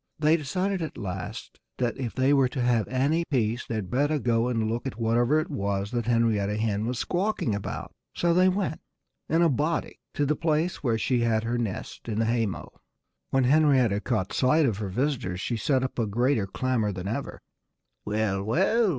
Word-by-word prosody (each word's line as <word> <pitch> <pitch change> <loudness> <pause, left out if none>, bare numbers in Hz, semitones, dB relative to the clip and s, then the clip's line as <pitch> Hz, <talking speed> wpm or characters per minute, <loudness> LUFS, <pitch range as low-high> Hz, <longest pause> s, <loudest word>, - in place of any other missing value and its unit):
They 155 +1 +4
decided 180 +5 -1
at 160 - -5
last 90 -2 -6 0.2
that 120 -1 0
if 125 -4 -4
they 130 +2 +3
were 135 -2 +4
to 125 +1 -4
have 120 -3 +2
any 140 +6 +1
peace 120 -4 -1
they'd 110 -5 -3
better 145 +4 +2
go 120 -3 +1
and 115 -3 0
look 115 +4 -2
at 125 - -6
whatever 120 +6 +2
it 155 +1 -4
was 100 -5 -2
that 120 -2 -2
Henrietta 110 -3 +2
Hen 110 0 -1
was 125 0 -2
squawking 180 - -1
about. 100 0 -5 0.2
So 170 -1 +2
they 185 +2 +5
went 185 -4 -2 0.5
in 165 +2 +3
a - - +6
body 155 +3 -1 0.2
to 145 - +1
the 150 +2 +1
place 160 +3 0
where 120 -5 +1
she 125 +2 +1
had 115 -2 +1
her 120 +1 -1
nest, 115 +1 -5
in 105 - -2
the 115 - +2
haymow. 115 -4 -1 0.6
When 135 0 +2
Henrietta 130 -7 +4
caught 110 -6 -1
sight 150 +4 +3
of 110 -7 0
her 100 -3 -3
visitors 120 -5 -1
she 120 - -2
set 130 +3 +1
up 130 - -3
a 115 - +1
greater 120 0 +1
clamor 115 0 0
than 90 0 -5
ever. 115 +7 -4 0.6
"Well, 105 -2 -1
well!" 195 - +2
120 Hz, 195 wpm, -26 LUFS, 110-145 Hz, 0.6 s, a